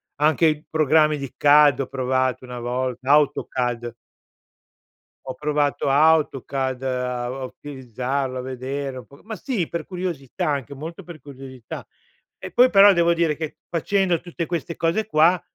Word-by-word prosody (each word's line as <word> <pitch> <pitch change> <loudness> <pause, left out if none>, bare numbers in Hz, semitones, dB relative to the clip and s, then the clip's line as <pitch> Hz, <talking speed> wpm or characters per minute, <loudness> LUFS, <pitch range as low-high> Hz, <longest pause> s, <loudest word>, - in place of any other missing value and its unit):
anche 155 +2 +2
i 155 -1 -1
programmi 155 0 +3
di 140 -2 -7
CAD 145 -2 +5
ho 135 - -3
provato, 130 -1 -1
una 125 -1 -7
volta, 125 +2 -3
AutoCAD. 125 -5 +1 1.3
Ho 130 - -5
provato 150 -2 0
AutoCad 135 -3 +2
a 125 -1 -2
a 130 +2 -5
utilizzarlo, 130 0 -4
a - - -3
vedere 130 +1 -5
un 125 - -12
po' 140 +6 -18
ma 220 +1 -6
sì, 215 - -2
per 170 - -5
curiosità, 175 -3 -4
anche 140 -1 -3
molto 165 +7 -8
per 175 -2 -11
curiosità. 130 -4 -10 0.5
E - - -9
poi, 250 +1 +5
però, 200 -3 +7
devo 170 -1 +3
dire 165 -2 +1
che, 155 0 -6
facendo 180 +1 +1
tutte 175 -1 -5
queste 170 0 -4
cose 170 +7 0
qua, 175 -2 +3
145 Hz, 150 wpm, -22 LUFS, 130-165 Hz, 1.3 s, però